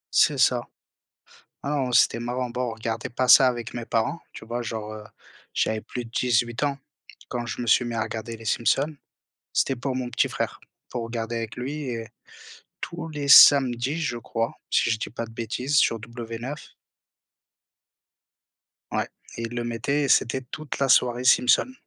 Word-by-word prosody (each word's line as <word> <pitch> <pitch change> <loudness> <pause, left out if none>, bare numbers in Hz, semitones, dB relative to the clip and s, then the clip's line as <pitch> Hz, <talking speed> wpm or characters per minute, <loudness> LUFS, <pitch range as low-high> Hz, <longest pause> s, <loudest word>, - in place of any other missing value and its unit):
C'est - - +4
ça. - - +2 1.0
Ah 140 - -2
non, 135 -4 0
c'était 115 -1 +4
marrant 120 +1 -3
bon 125 +1 -3
on - - -5
regardait 115 0 -4
pas 130 +2 -1
ça 130 +1 +8
avec 120 -2 -3
mes 120 -1 -5
parents, 115 +10 -1
tu - - -10
vois? 120 +2 -3
Genre, 110 -2 -5
heu, 110 0 -8 0.5
j'avais 110 0 0
plus 125 +2 -6
de 115 - -14
18 120 0 +1
ans 145 -1 0 0.5
quand 120 -1 -4
je - - -5
me - - -3
suis 120 +2 +4
mis 120 -1 -4
à 110 - 0
regarder 115 +1 -6
les 115 - -13
Simpsons, 135 +7 +1 0.6
c'était 135 - +1
pour 130 +2 -3
mon 130 -1 -3
petit 120 - +1
frère - - -3 0.3
pour 120 - -3
regarder 115 0 -4
avec 115 -1 -5
lui 140 +3 -4
et 115 -2 -4 0.7
tous 170 -1 -6
les 150 -2 -5
samedis 135 +1 +7
je 125 -7 -2
crois, 115 0 -3 0.2
si - - +2
je 110 - +1
dis - - -5
pas 115 +1 -5
de 115 - -14
bêtises 120 +5 -2
sur 115 - +3
W9. 115 +4 -6 2.4
Ouais, - - -1 0.3
il 115 +1 -5
le 120 - -2
mettait 120 +5 -1
et - - 0
c'était 130 +2 +3
toute 145 +3 -7
la 140 - +2
soirée 125 -1 +4
Simpson. 130 - +4
120 Hz, 180 wpm, -25 LUFS, 115-130 Hz, 2.4 s, ça